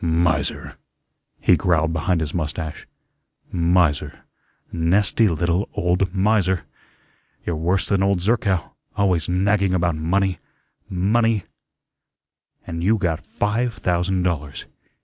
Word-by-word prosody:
"Miser," 80 Hz, -3 st, 0 dB, 0.6 s
he -, -, +4 dB
growled 80 Hz, -2 st, +1 dB
behind 85 Hz, +2 st, 0 dB
his 80 Hz, 0 st, -3 dB
mustache. 80 Hz, -1 st, -4 dB, 0.6 s
"Miser, 85 Hz, -3 st, +1 dB, 0.5 s
nasty 95 Hz, +6 st, +3 dB
little 85 Hz, +3 st, 0 dB
old 90 Hz, +1 st, +1 dB
miser. 95 Hz, -2 st, +1 dB, 0.8 s
You're 85 Hz, -, -1 dB
worse 90 Hz, +4 st, 0 dB
than 100 Hz, -2 st, +1 dB
old 100 Hz, -1 st, +2 dB
Zerkow, 100 Hz, -3 st, 0 dB, 0.3 s
always 90 Hz, -6 st, +1 dB
nagging 95 Hz, +1 st, +2 dB
about 85 Hz, -2 st, +1 dB
money, 90 Hz, +3 st, 0 dB, 0.5 s
money, 105 Hz, +3 st, +1 dB, 1.2 s
and 85 Hz, 0 st, -5 dB
you 110 Hz, +4 st, +3 dB
got 85 Hz, -6 st, -1 dB
five 115 Hz, +3 st, -1 dB
thousand 90 Hz, +1 st, 0 dB
dollars. 75 Hz, -6 st, -3 dB
90 Hz, 110 wpm, -22 LUFS, 85-100 Hz, 1.2 s, he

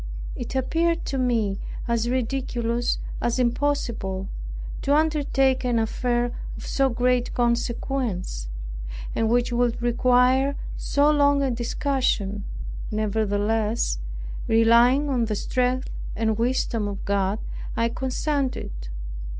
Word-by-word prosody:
It -, -, -5 dB
appeared 330 Hz, +6 st, +1 dB
to 270 Hz, -, -2 dB
me 225 Hz, -6 st, +1 dB, 0.3 s
as 235 Hz, 0 st, +1 dB
ridiculous, 240 Hz, -2 st, 0 dB, 0.2 s
as 240 Hz, +1 st, +1 dB
impossible, 235 Hz, -7 st, 0 dB, 0.5 s
to 285 Hz, -, +3 dB
undertake 285 Hz, -4 st, +2 dB
an 245 Hz, -2 st, +1 dB
affair 240 Hz, +2 st, 0 dB, 0.3 s
of -, -, -8 dB
so 270 Hz, -1 st, +2 dB
great 250 Hz, 0 st, +1 dB
consequence, 235 Hz, -, -1 dB, 0.7 s
and 225 Hz, -1 st, +1 dB
which 245 Hz, +1 st, +2 dB
would 240 Hz, -1 st, +1 dB
require 250 Hz, +3 st, +3 dB, 0.2 s
so 290 Hz, +1 st, +3 dB
long 285 Hz, -1 st, +4 dB
a 265 Hz, -, +1 dB
discussion. 235 Hz, -5 st, 0 dB, 0.4 s
Nevertheless, 215 Hz, -, 0 dB, 0.5 s
relying 235 Hz, +5 st, +5 dB
on 250 Hz, -4 st, +1 dB
the 215 Hz, -1 st, -1 dB
strength 255 Hz, +4 st, 0 dB, 0.2 s
and 220 Hz, -1 st, +1 dB
wisdom 230 Hz, -2 st, 0 dB
of 200 Hz, -1 st, -5 dB
God, 200 Hz, 0 st, +1 dB, 0.4 s
I 230 Hz, -, +3 dB
consented. 265 Hz, -, -1 dB
240 Hz, 110 wpm, -25 LUFS, 225-265 Hz, 0.7 s, relying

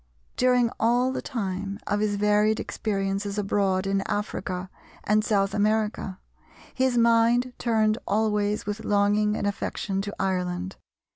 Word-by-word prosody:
During 250 Hz, -2 st, +3 dB
all 245 Hz, +3 st, +2 dB
the -, -, -3 dB
time 200 Hz, -5 st, -4 dB
of 205 Hz, -, 0 dB
his 210 Hz, -1 st, 0 dB
varied 210 Hz, +1 st, +2 dB
experiences 200 Hz, -1 st, -2 dB
abroad 195 Hz, -2 st, +1 dB
in 195 Hz, 0 st, +1 dB
Africa 185 Hz, -3 st, -3 dB, 0.3 s
and 215 Hz, +1 st, +2 dB
South 200 Hz, -2 st, +1 dB
America, 210 Hz, -2 st, 0 dB, 0.6 s
his 260 Hz, -2 st, +1 dB
mind 235 Hz, +2 st, +3 dB
turned 220 Hz, -1 st, +2 dB
always 210 Hz, 0 st, 0 dB
with 210 Hz, +1 st, -4 dB
longing 205 Hz, +1 st, +2 dB
and -, -, -2 dB
affection 200 Hz, -1 st, -2 dB
to 205 Hz, +1 st, -6 dB
Ireland. 185 Hz, -1 st, -2 dB
210 Hz, 130 wpm, -26 LUFS, 195-220 Hz, 0.6 s, During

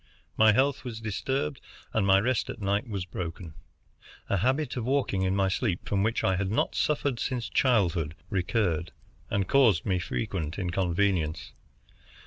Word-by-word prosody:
My 110 Hz, 0 st, +6 dB
health 135 Hz, +5 st, +2 dB
was 120 Hz, -4 st, -6 dB
disturbed 130 Hz, +6 st, -2 dB, 0.3 s
and 105 Hz, -3 st, +1 dB
my 95 Hz, 0 st, +6 dB
rest 125 Hz, +3 st, 0 dB
at -, -, -6 dB
night 100 Hz, +2 st, -1 dB
was 100 Hz, -4 st, -3 dB
broken. 85 Hz, -2 st, -6 dB, 0.8 s
A 100 Hz, -, +3 dB
habit 130 Hz, -, 0 dB
of 125 Hz, -, -2 dB
walking 130 Hz, -6 st, 0 dB
in 95 Hz, 0 st, +1 dB
my 100 Hz, -1 st, +2 dB
sleep, 95 Hz, -1 st, -1 dB
from 100 Hz, -1 st, +1 dB
which 110 Hz, +3 st, 0 dB
I 95 Hz, -1 st, +2 dB
had 95 Hz, 0 st, -1 dB
not 110 Hz, -, 0 dB
suffered 140 Hz, -5 st, 0 dB
since 125 Hz, -3 st, -2 dB
childhood, 90 Hz, -, +1 dB, 0.2 s
recurred, 90 Hz, -3 st, 0 dB, 0.4 s
and 100 Hz, -2 st, 0 dB
caused 115 Hz, -11 st, +4 dB
me 95 Hz, -3 st, +1 dB
frequent 90 Hz, -4 st, -3 dB
inconvenience. 90 Hz, -3 st, 0 dB
100 Hz, 155 wpm, -28 LUFS, 90-120 Hz, 0.8 s, My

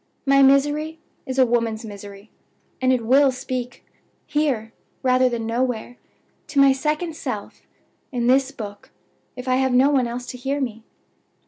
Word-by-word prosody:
My 275 Hz, 0 st, +5 dB
misery 295 Hz, +4 st, +3 dB, 0.3 s
is 260 Hz, 0 st, -4 dB
a 260 Hz, -, +6 dB
woman's 230 Hz, -2 st, -1 dB
misery, 200 Hz, 0 st, -10 dB, 0.5 s
and 260 Hz, 0 st, +3 dB
it 245 Hz, -3 st, 0 dB
will 270 Hz, +3 st, +5 dB
speak 250 Hz, -1 st, -5 dB, 0.4 s
here, 265 Hz, -8 st, -1 dB, 0.3 s
rather 255 Hz, 0 st, +4 dB
than 235 Hz, -2 st, -3 dB
nowhere; 245 Hz, 0 st, -2 dB, 0.5 s
to 280 Hz, -, 0 dB
my 275 Hz, 0 st, +7 dB
second 305 Hz, +4 st, -2 dB
self, -, -, -6 dB, 0.5 s
in 245 Hz, -2 st, -1 dB
this 265 Hz, +2 st, +4 dB
book, 205 Hz, -7 st, -9 dB, 0.5 s
if 250 Hz, +1 st, -8 dB
I 255 Hz, 0 st, +2 dB
have 265 Hz, -1 st, +1 dB
no 265 Hz, +3 st, +5 dB
one 260 Hz, -4 st, +2 dB
else 245 Hz, +1 st, -5 dB
to 250 Hz, -, -10 dB
hear 275 Hz, +3 st, -2 dB
me. 230 Hz, -5 st, -4 dB
255 Hz, 155 wpm, -22 LUFS, 235-275 Hz, 0.5 s, my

